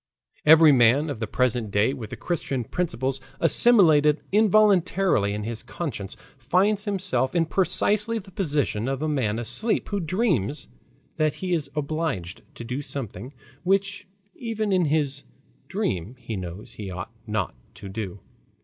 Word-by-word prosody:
Every 160 0 +8
man 135 +4 +4
of 130 - -6
the 110 - -3
present 120 -1 0
day 105 +6 +2
with 120 -6 -7
the - - -6
Christian 140 -7 -2
principles 135 -2 -2 0.2
assimilated 160 -6 +6
involuntarily 195 - +3
in 105 +1 -3
his 115 +1 -5
conscience, 120 - -6 0.2
finds 195 - +1
himself 180 - 0
in 165 -1 +3
precisely 205 +6 +1
the 195 -3 -9
position 145 - -1
of 135 +2 -2
a - - 0
man 125 -8 0
asleep 130 - 0
who 205 - -1
dreams 165 - -1 0.5
that 155 -2 +1
he 185 -1 -3
is 160 -4 -1
obliged 150 - -3
to - - -8
do 125 +4 -4
something 125 -4 -6 0.3
which 200 +2 0 0.3
even 220 -3 -3
in 180 -2 +3
his 145 -2 0 0.4
dream 95 +7 -3
he 115 -3 -6
knows 90 +1 -7
he 105 -3 -7
ought 90 +4 -6 0.2
not 105 - -2 0.2
to - - -10
do. 100 -1 -6
145 Hz, 150 wpm, -25 LUFS, 115-185 Hz, 0.5 s, Every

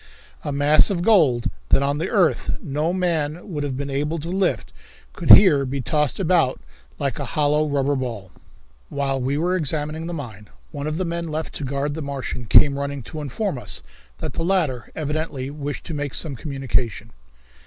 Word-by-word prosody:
A 145 - -3
mass 145 +2 +5
of 175 -4 -1
gold 150 - +4 0.2
that 135 - +4
on 140 +1 0
the 165 - -2
earth 190 -7 +1
no 150 +4 -1
man 170 -2 -1
would 150 -3 -2
have 135 -3 -3
been 140 0 -4
able 150 +4 -1
to 165 +2 -5
lift 190 -1 0 0.4
could - - -5
here 155 -9 +9
be 135 +1 -3
tossed 150 +4 0
about 165 -7 +2 0.4
like - - -2
a - - -2
hollow 150 +1 +3
rubber 140 0 +1
ball. 115 -8 -4 0.6
While 135 -1 -1
we 135 +3 0
were 175 +4 +1
examining 155 0 -1
the 175 - -4
mine, 110 -8 -8 0.2
one 145 -1 -4
of 155 +1 -2
the 185 - -1
men 170 0 -3
left 155 +1 -4
to - - -5
guard 140 +2 -2
the 160 - -5
Martian 135 -4 -5
came 140 +5 +6
running 140 -2 -4
to 155 +6 -7
inform 145 - -3
us 100 - -4 0.3
that - - -5
the 165 - -2
latter 165 -10 0
evidently 150 -3 -3
wished 145 -1 -5
to 170 - -5
make 145 -2 -3
some 150 -5 -2
communication. 125 -6 -2
145 Hz, 185 wpm, -22 LUFS, 135-160 Hz, 0.6 s, here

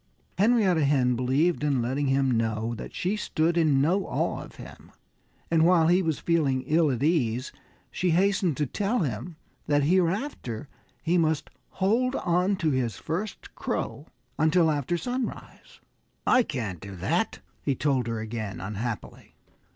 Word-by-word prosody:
Henrietta 200 -7 +4
Hen 130 -3 +3
believed 140 +7 +1
in 140 -3 +2
letting 130 +4 -1
him 135 0 +2
know 115 0 0
that 115 - -8
she 185 +4 0
stood 170 -5 0
in 155 -5 +3
no 180 +8 +1
awe - - -1
of - - -12
him. - - -12 0.6
And 160 -1 +4
while 165 -1 +5
he 180 +2 +4
was 160 -4 0
feeling 145 -6 +1
ill 160 +1 +2
at 125 -1 -1
ease 130 -6 +1 0.4
she 180 - 0
hastened 185 -2 +2
to 150 - +1
tell 205 - -1
him 130 +3 -3 0.3
that 145 -1 +3
hereafter 170 - 0 0.4
he 175 +2 +2
must 160 -2 0 0.2
hold 235 +7 +1
onto 180 -1 +1
his 125 -4 -1
first 185 +6 -5
crow 145 +3 -4 0.3
until 160 +1 +4
after 150 +4 -1
sunrise. 245 +8 -5 0.4
"I 255 - +5
can't 115 - -4
do 100 +2 -9
that," 85 - -1 0.2
he 140 - 0
told 130 -3 0
her 115 -1 -2
again, 110 -2 -5
unhappily. 105 +3 -6
155 Hz, 150 wpm, -27 LUFS, 125-180 Hz, 0.6 s, while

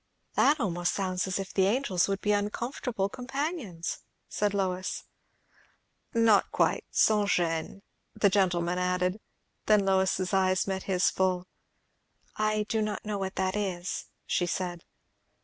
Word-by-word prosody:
"That 295 +1 +4
almost 175 -6 0
sounds 185 -1 -1
as 185 - -1
if 195 -1 -5
the 190 -1 +3
angels 205 -5 +1
would 195 0 -2
be 210 - +1
uncomfortable 210 +1 -1
companions," 255 - -4 0.3
said 210 -1 0
Lois. 185 -1 -1 1.1
"Not 225 -3 +4
quite - - +1
sans 210 -2 +3
gêne" 170 +2 0 0.3
the 200 - +3
gentleman 180 -3 +1
added, 180 +2 0 0.5
Then 210 -2 +5
Lois's 190 0 +1
eyes 185 -1 +3
met 190 -1 -3
his 185 -1 +3
full. 185 -1 0 0.9
"I 215 0 +1
do 220 0 0
not 210 0 -3
know 210 -1 -2
what 190 -1 -3
that 190 0 0
is," 190 -3 -3 0.2
she 175 - 0
said. 175 -1 -3
195 Hz, 135 wpm, -29 LUFS, 180-210 Hz, 1.1 s, Then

